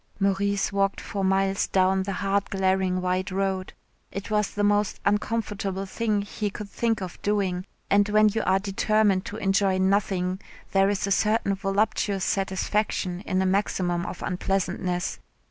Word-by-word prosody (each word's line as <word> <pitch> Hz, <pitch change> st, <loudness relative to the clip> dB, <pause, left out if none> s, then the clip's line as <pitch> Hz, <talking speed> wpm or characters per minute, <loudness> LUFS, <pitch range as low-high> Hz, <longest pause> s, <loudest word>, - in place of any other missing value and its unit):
Maurice 200 Hz, +1 st, +1 dB
walked 195 Hz, 0 st, +1 dB
for 200 Hz, -1 st, -4 dB
miles 195 Hz, +1 st, +2 dB
down 190 Hz, 0 st, +2 dB
the 195 Hz, +1 st, -3 dB
hard 200 Hz, 0 st, +1 dB
glaring 190 Hz, -1 st, +1 dB
white 185 Hz, +2 st, -1 dB
road. 190 Hz, 0 st, -1 dB, 0.4 s
It 195 Hz, +2 st, -6 dB
was 210 Hz, -1 st, +2 dB
the 205 Hz, -, -2 dB
most 205 Hz, 0 st, +2 dB
uncomfortable 205 Hz, -2 st, -1 dB
thing 210 Hz, +1 st, -1 dB
he 205 Hz, 0 st, -3 dB
could 200 Hz, 0 st, -8 dB
think 225 Hz, -3 st, 0 dB
of 180 Hz, -, -8 dB
doing, 195 Hz, -3 st, 0 dB, 0.2 s
and 205 Hz, +1 st, +3 dB
when 215 Hz, +1 st, +5 dB
you 220 Hz, +2 st, -1 dB
are 190 Hz, +1 st, +4 dB
determined 200 Hz, 0 st, +1 dB
to 210 Hz, -, -6 dB
enjoy 195 Hz, -2 st, +2 dB
nothing 190 Hz, -1 st, +1 dB, 0.3 s
there 195 Hz, 0 st, +4 dB
is 200 Hz, -1 st, 0 dB
a 200 Hz, -, -3 dB
certain 210 Hz, 0 st, +2 dB
voluptuous 195 Hz, 0 st, 0 dB
satisfaction 190 Hz, -1 st, -1 dB
in 185 Hz, 0 st, +1 dB
a -, -, 0 dB
maximum 185 Hz, -2 st, 0 dB
of -, -, -6 dB
unpleasantness. 180 Hz, -1 st, -1 dB
195 Hz, 155 wpm, -26 LUFS, 190-205 Hz, 0.4 s, when